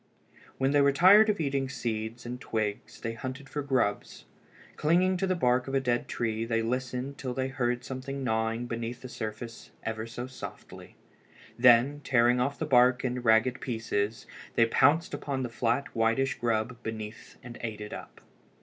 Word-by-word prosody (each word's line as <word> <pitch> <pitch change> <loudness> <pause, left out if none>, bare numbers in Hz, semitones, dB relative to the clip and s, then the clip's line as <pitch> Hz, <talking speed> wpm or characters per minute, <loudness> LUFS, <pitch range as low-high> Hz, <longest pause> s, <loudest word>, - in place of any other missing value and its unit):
When 135 +1 +1
they 145 0 +4
were 140 0 +5
tired 200 +9 +7
of 210 - +1
eating 140 -3 -1
seeds 115 -2 -4
and 125 +1 -6
twigs 105 -2 -3
they 115 0 -3
hunted 130 +3 -6
for 145 - -3
grubs. 130 -7 -1 0.5
Clinging 180 +5 +3
to 190 +1 0
the 185 - +1
bark 125 -5 +2
of 135 - -2
a - - +4
dead 120 -2 0
tree 115 -1 -2
they 115 0 0
listened 125 +3 -3
till 125 -2 -4
they 130 0 -1
heard 125 -2 -1
something 135 +1 -5
gnawing 110 0 0
beneath 120 +1 -5
the - - -6
surface 115 0 -7
ever 110 0 -3
so 120 +1 -6
softly. 130 0 -10 0.6
Then, 125 +4 +5
tearing 125 -1 +3
off 140 +3 0
the 160 - -2
bark 125 -2 +4
in 125 0 -1
ragged 115 +2 +3
pieces, 110 -3 -2 0.3
they 115 - +5
pounced 150 +9 +3
upon 135 -2 -3
the 125 - -3
flat 120 +3 -1
whitish 115 +4 +1
grub 120 +1 -1
beneath 110 -1 -7
and 120 -1 -9
ate 110 -2 -4
it 105 0 -7
up. - - -10
125 Hz, 175 wpm, -29 LUFS, 115-135 Hz, 0.6 s, tired